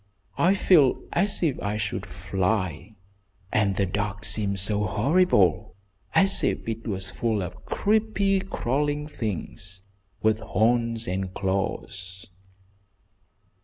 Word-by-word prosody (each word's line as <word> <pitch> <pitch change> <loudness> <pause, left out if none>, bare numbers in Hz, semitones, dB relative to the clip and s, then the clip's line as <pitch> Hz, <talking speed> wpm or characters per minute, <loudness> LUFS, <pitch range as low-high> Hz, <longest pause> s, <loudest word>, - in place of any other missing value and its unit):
"I 185 +3 +4
feel 155 -9 +4
as 195 +1 0
if 150 -6 0
I 105 +1 -2
should 100 -1 -3
fly, 95 +2 -2 0.6
and 100 -2 +2
the 100 - +1
dark 100 +2 -3
seems 100 -1 +2
so 105 +1 +2
horrible, 105 - +2 0.4
as 195 0 +4
if - - -1
it 115 0 -4
was 95 -3 -3
full 110 -1 -1
of 90 +1 -9
creepy, 205 -2 +1
crawling 145 -3 -2
things, 95 - -6 0.4
with 110 0 +3
horns 115 +1 +1
and 95 0 -2
claws." 95 0 -3
105 Hz, 115 wpm, -25 LUFS, 95-140 Hz, 0.6 s, I